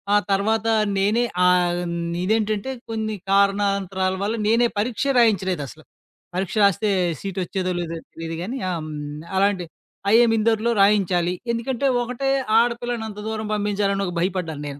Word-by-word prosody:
ఆ - - +7
తర్వాత 220 +3 +1 0.3
నేనే 210 +5 +2 0.2
ఆహ్, 180 -1 +3 0.4
ఇదేంటంటే 215 +3 0 0.2
కొన్ని 220 -1 -2 0.2
కారణాంతరాల 195 -1 +2
వల్ల 220 +3 -1
నేనే 235 +2 +4
పరీక్షే 245 +6 0
రాయించలేదసల. 185 - +1 0.5
పరీక్ష 190 +3 -2
రాస్తే 200 +2 +3 0.3
సీటొచ్చేదో 190 -1 -3
లేదో 165 -1 -4 0.2
తెలీదుగానీ 165 +10 -5
ఆ! - - -1
హ్మ్, 150 0 -6
అలాంటి 195 -2 +2 0.5
ఐఎం 230 0 +6
ఇందోర్‌లో 225 +1 +2
రాయించాలి. 185 -4 +3 0.2
ఎందుకంటే 240 +3 -2 0.2
ఒకటే 250 +3 -2 0.3
ఆడపిల్లనంత 235 -2 -2
దూరం 220 -1 -3
పంపించాలని 200 -1 0
ఒక 180 - -4
భయపడ్డాను 175 -5 -2
నేను. 140 0 -8
200 Hz, 120 wpm, -22 LUFS, 180-225 Hz, 0.5 s, ఆ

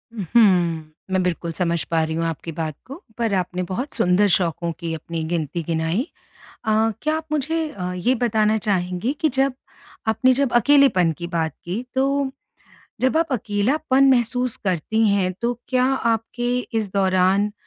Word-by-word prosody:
उ, 215 - -4
हुँ। 170 -8 +3 0.2
मैं 190 0 +2
बिल्कुल 170 -1 -2
समझ 170 0 0
पा 165 -1 +2
रही 160 0 -2
हूँ 165 0 -1
आपकी 165 0 -4
बात 155 -1 -4
को। 270 - -8 0.2
पर 230 -3 0
आपने 185 -1 -1
बहुत 190 +11 -4
सुंदर 205 -3 +3
शौकों 170 -1 -1
की 165 -2 -4
अपनी 160 +1 -5
गिनती 165 0 -2
गिनाई। 165 - -1 0.6
अ, 220 - +1 0.3
क्या 310 +1 0
आप 320 - -6
मुझे 315 +2 0
अ, 180 -9 -5
ये 240 +9 +1
बताना 220 -2 +2
चाहेंगी 190 +3 -1
कि 315 - +3
जब 270 0 +1 0.5
आपने 255 +4 +3
जब 270 -1 0
अकेलेपन 265 - +4
की 170 - -5
बात 165 -2 -1
की, 190 +8 -4
तो 275 +1 +1 0.7
जब 260 +4 +2
आप 325 -2 +1
अकेलापन 260 +6 +1
महसूस 245 -1 +1
करती 200 +5 +1
हैं। 195 -2 +1
तो 240 +1 +1 0.2
क्या 255 -1 +2
आपके 240 -1 0 0.2
इस 205 -4 -3
दौरान 190 +1 +2
205 Hz, 165 wpm, -22 LUFS, 175-255 Hz, 0.7 s, अकेलेपन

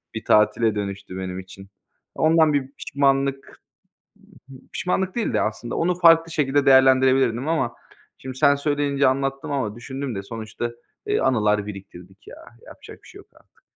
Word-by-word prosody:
bir 110 - -6
tatile 105 +1 +3
dönüştü 100 -2 -5
benim 95 0 -5
için. 95 +1 -12 0.5
Ondan 160 -1 +3
bir 135 -1 -1
pişmanlık 135 -1 -1 0.9
b - - -11 0.2
pişmanlık 185 +1 -2
değil 235 - -1
de - - +2
aslında 115 +2 -4
onu 175 +2 +1
farklı 165 -1 +5
şekilde 145 -2 +1
değerlendirebilirdim 130 -1 +4
ama 160 -8 -1 0.4
şimdi 130 0 -8
sen 145 -1 +5
söyleyince 145 -1 0
anlattım 135 +3 -2
ama 115 -7 -2
düşündüm 130 +1 -6
de 95 - -5
sonuçta, 115 +2 -6 0.3
eee, 415 +1 0
anılar 105 -4 +1
biriktirdik 95 -1 -12
ya. - - -11 0.3
Yapacak - - -14
bir - - -16
şey - - -14
yok - - -17
artık. - - -27
130 Hz, 155 wpm, -22 LUFS, 105-145 Hz, 0.9 s, farklı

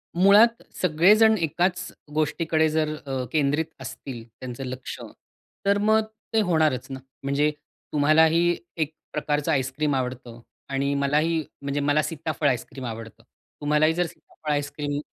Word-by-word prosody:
मुळात, 205 +6 +6 0.2
सगळेजण 205 +7 +5
एकाच 175 +3 0 0.2
गोष्टीकडे 155 +1 +1
जर 155 0 0
अ, 135 -2 -2
केंद्रित 150 +1 +1 0.2
असतील 130 -2 -7 0.2
त्यांचं 130 +1 -6
लक्ष 130 0 -6 0.7
तर 200 0 +4
मग 215 +2 +3 0.3
ते 220 - +4
होणारच 155 -9 +1
ना. 135 - -5 0.2
म्हणजे 145 +2 +2 0.4
तुम्हालाही 160 +3 +4 0.2
एक 155 -1 -1 0.2
प्रकारचं 150 -1 0
आईस्क्रीम 135 +2 0
आवडतं 125 -2 -4 0.3
आणि 140 +1 0
मलाही 150 +3 +1 0.2
म्हणजे 140 +1 -2
मला 145 +1 +2
सीताफळ 155 -1 -2
आईस्क्रीम 130 0 -2
आवडतं. 115 0 -8 0.4
तुम्हालाही 150 +2 +3
जर 175 +1 +1
सीताफळ 155 -1 -8
आईस्क्रीम 145 0 -2
150 Hz, 125 wpm, -25 LUFS, 140-165 Hz, 0.7 s, मुळात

